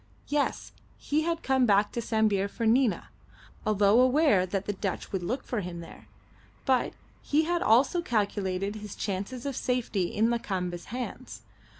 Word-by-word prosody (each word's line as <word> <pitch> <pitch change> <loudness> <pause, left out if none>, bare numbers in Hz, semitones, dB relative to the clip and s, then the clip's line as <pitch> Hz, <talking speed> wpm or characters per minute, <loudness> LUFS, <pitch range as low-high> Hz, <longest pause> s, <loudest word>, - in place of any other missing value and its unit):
Yes, 290 -1 -1 0.3
he 300 +2 0
had 335 +1 -2
come 265 -2 +3
back 205 0 +3
to 235 - -3
Sambir 215 -3 +1
for 230 +3 -4
Nina, 235 0 +2 0.6
although 210 +2 +4
aware 255 - +4
that 195 +1 -2
the 205 - -2
Dutch 195 -1 -4
would 190 - -2
look 245 +10 -2
for 235 -4 -2
him 175 -2 -6
there, 170 - -12 0.6
but 260 -2 +2 0.3
he 300 +2 +2
had 345 +1 0
also 265 +10 +4
calculated 200 - -1
his 210 -2 -8
chances 205 +6 -4
of 280 -2 -2
safety 235 -8 -1
in 220 +6 +1
Lakamba's 185 -7 -3
hands. 245 +2 -6
220 Hz, 160 wpm, -28 LUFS, 195-255 Hz, 0.6 s, although